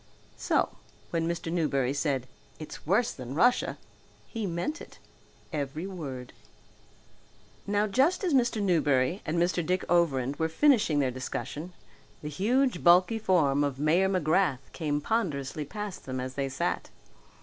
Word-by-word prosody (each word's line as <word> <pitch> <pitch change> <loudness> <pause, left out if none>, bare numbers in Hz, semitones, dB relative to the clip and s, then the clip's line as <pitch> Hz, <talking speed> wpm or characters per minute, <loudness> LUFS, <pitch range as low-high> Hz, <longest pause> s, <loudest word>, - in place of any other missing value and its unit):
So - - +1 0.4
when 165 -1 0
Mr. 170 -1 -3
Newberry 140 -6 +1
said 140 -3 -1 0.3
"It's 155 -1 -9
worse 220 +7 +3
than 130 +1 -7
Russia!" 245 +9 +3 0.5
he 225 -4 -4
meant 185 - -3
it, - - -12 0.6
every 150 +3 -3
word. 140 -10 -7 1.3
Now 205 +1 +2
just 270 - +2
as 355 -5 +1
Mr. 240 -4 +2
Newberry 155 -2 +2
and 160 +3 -1
Mr. 175 0 +1
Dick 180 +3 0
Overend 145 -6 +2
were 160 0 0
finishing 215 - +3
their 135 -3 +2
discussion, 145 +6 -5 0.5
the 150 - -4
huge 235 - +1
bulky 180 +6 +5
form 150 -9 +2
of 140 -2 -1
Mayor 165 +7 +3
McGrath 160 -6 +1
came 150 -3 -1
ponderously 150 - -1
past 210 +4 -6
them 130 0 -3
as 130 0 -4
they 135 0 -2
sat. 130 - -2
165 Hz, 140 wpm, -28 LUFS, 140-195 Hz, 1.3 s, bulky